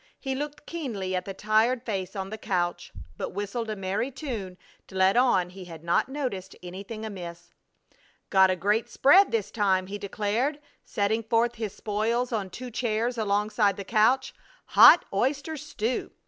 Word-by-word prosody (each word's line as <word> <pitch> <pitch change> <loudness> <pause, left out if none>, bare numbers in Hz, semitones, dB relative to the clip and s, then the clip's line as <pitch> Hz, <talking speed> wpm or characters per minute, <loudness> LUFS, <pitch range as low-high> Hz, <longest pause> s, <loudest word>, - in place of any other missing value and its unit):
He 270 -1 -3
looked 295 +2 -5
keenly 220 - -4
at 180 0 -2
the 195 - -5
tired 220 +4 +2
face 195 -3 -3
on 195 0 -4
the 220 - -5
couch, 175 -4 -2 0.3
but - - -4
whistled 205 +3 -3
a 215 - -2
merry 195 +5 -2
tune 235 -10 -6 0.3
to 190 - -13
let 190 +2 +4
on 215 -8 +3
he 185 0 -10
had 165 -2 -11
not 170 +8 +1
noticed 245 -10 -4
anything 200 +5 -7
amiss. 175 -5 -8 0.8
"Got 190 -1 +6
a 185 - +2
great 205 +5 0
spread 375 +8 +5
this 225 -4 -1
time," 190 -4 +1
he 205 +2 -6
declared, 215 +8 -1 0.2
setting 215 +2 0
forth 230 +2 +1
his 220 -4 -5
spoils 225 +4 -1
on 205 -5 -2
two 250 +6 -8
chairs 235 +1 -1
alongside 210 -1 +1
the 200 - -5
couch. 240 +5 +2 0.4
"Hot 340 - +8
oyster 275 +9 0
stew! 255 -5 -3
215 Hz, 165 wpm, -27 LUFS, 190-245 Hz, 0.8 s, Hot